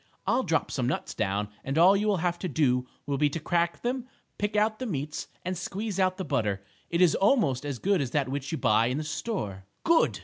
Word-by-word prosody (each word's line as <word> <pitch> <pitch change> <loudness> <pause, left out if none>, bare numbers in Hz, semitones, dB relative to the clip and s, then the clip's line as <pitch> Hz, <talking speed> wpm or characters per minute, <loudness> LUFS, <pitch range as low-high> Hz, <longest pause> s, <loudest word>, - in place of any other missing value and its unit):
"I'll - - +3
drop - - 0
some - - -1
nuts - - -2
down 100 +2 -1
and 135 +3 -2
all 180 +4 +7
you 210 +2 +1
will 205 -2 +3
have 175 -1 0
to 185 - -2
do 125 -5 +1 0.2
will 140 -1 -1
be 150 -1 +4
to 155 - -4
crack 170 +2 0
them, 250 +1 -2 0.3
pick 205 0 -1
out 215 +1 +2
the 255 - -3
meats 150 -4 -3 0.2
and 185 +1 -1
squeeze 195 +3 -4
out 185 -1 +2
the 190 - -3
butter. 100 -3 0 0.3
It 170 +1 +1
is 175 -3 +6
almost 195 - +3
as 140 -3 -3
good 195 +4 +2
as 135 - -1
that 140 0 0
which 140 +1 -3
you 160 - -1
buy 110 -1 +3
in 125 +3 -1
the 155 - -2
store." 150 - -4 0.2
"Good!" 330 0 +3
165 Hz, 235 wpm, -28 LUFS, 135-200 Hz, 0.3 s, all